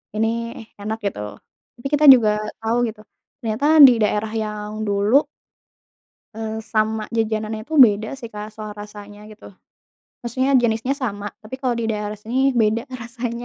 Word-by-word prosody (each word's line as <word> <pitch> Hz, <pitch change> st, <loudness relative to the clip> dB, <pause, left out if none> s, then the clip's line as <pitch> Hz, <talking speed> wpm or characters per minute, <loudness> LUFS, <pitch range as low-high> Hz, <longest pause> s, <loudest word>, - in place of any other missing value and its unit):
ini 220 Hz, +1 st, +1 dB, 0.5 s
enak," 215 Hz, +2 st, -3 dB
gitu, 195 Hz, -, -3 dB, 0.6 s
tapi 240 Hz, +3 st, -5 dB
kita 300 Hz, +1 st, +3 dB
juga 230 Hz, -4 st, +3 dB, 0.3 s
tau 225 Hz, +2 st, 0 dB
gitu, 215 Hz, -1 st, -8 dB, 0.4 s
ternyata 225 Hz, +3 st, -2 dB, 0.2 s
di 250 Hz, -, +6 dB
daerah 210 Hz, +1 st, 0 dB
yang 215 Hz, 0 st, -4 dB
dulu 205 Hz, +8 st, +3 dB, 1.1 s
eee, 220 Hz, 0 st, -5 dB, 0.2 s
sama 220 Hz, 0 st, +1 dB
jajanannya 220 Hz, -1 st, -1 dB
itu 315 Hz, -, -4 dB
beda 210 Hz, +1 st, -2 dB
sih 235 Hz, -, -7 dB
Kak 210 Hz, 0 st, -6 dB
soal 215 Hz, -1 st, -7 dB
rasanya 205 Hz, 0 st, -11 dB
gitu. 215 Hz, -, -15 dB, 0.8 s
Maksudnya 255 Hz, +3 st, -1 dB
jenisnya 230 Hz, +3 st, 0 dB
sama, 205 Hz, -4 st, -3 dB, 0.2 s
tapi 215 Hz, +4 st, -8 dB
kalau 250 Hz, -3 st, 0 dB
di -, -, -2 dB
daerah 210 Hz, -1 st, -3 dB
sini 230 Hz, +4 st, -5 dB, 0.2 s
beda 220 Hz, +1 st, +2 dB, 0.2 s
rasanya 235 Hz, 0 st, -5 dB
220 Hz, 145 wpm, -21 LUFS, 210-235 Hz, 1.1 s, di